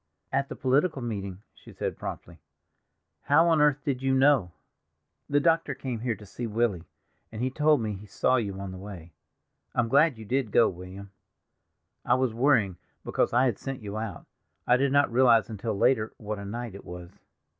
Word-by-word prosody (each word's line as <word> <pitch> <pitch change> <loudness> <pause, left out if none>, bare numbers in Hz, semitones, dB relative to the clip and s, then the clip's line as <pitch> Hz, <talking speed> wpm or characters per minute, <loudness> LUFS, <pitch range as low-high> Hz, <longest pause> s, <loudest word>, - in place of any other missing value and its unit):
"At 135 +1 0
the - - -6
political 135 +2 +1
meeting," 100 -4 -5
she - - -16
said - - -4
promptly. - - -8 0.9
"How 160 +5 +5
on 160 -2 +4
earth 145 -1 +3
did 130 -3 -1
you 135 0 +1
know?" 135 -8 +4 0.8
"The 145 0 +3
doctor 165 -2 +2
came 130 -4 -4
here 115 0 -1
to 105 - -13
see 115 +4 -6
Willy, 110 -6 0 0.5
and 110 - -7
he 130 +2 -1
told 150 -1 +3
me 110 -2 -2
he 100 +2 -10
saw 130 +5 +1
you 100 -5 -3
on 100 -1 -5
the 95 - -8
way. 90 -4 -10 0.6
I'm 120 -1 +1
glad 145 0 +4
you 110 - -9
did 130 +1 0
go, 115 +1 +5
William; 95 +2 -10 0.9
I 120 - +3
was 130 -3 0
worrying 115 -7 +2 0.3
because - - 0
I 125 +3 +3
had 120 -6 0
sent 135 -4 -6
you 100 0 -6
out; 110 -4 -5 0.4
I 125 - +5
did 135 +1 +1
not 140 -2 +3
realize 120 -3 +4
until 110 0 -3
later 110 -1 +2
what 105 -1 -5
a 100 - -7
night 115 +1 -5
it 100 - -10
was." 90 0 -10
120 Hz, 190 wpm, -27 LUFS, 100-135 Hz, 0.9 s, How